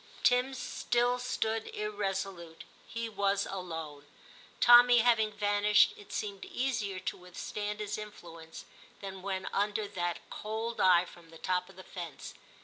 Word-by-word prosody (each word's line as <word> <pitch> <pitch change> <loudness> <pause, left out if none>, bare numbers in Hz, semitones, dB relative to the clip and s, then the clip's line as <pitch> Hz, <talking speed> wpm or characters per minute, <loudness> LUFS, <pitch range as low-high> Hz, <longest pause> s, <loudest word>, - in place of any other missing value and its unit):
Tim 250 +2 +3
still 245 0 0
stood 225 -3 -1
irresolute: 195 -5 -3 0.2
he 230 0 -4
was 200 -2 0
alone. 160 -6 -6 0.5
Tommy 240 0 +8
having 225 -2 +3
vanished, 205 0 +4
it 205 - -14
seemed 200 -2 -4
easier 235 -7 -2
to - - -3
withstand 205 +3 -5
his 210 0 -3
influence 165 -6 -10 0.3
than 190 -1 -7
when 190 -1 -3
under 205 +1 0
that 175 -3 -3
cold 220 +2 -4
eye 180 -1 +6
from 170 -2 -15
the 165 - -13
top 180 +1 -1
of 195 - -15
the 185 - -11
fence. 170 -6 -8
205 Hz, 140 wpm, -31 LUFS, 180-220 Hz, 0.5 s, Tommy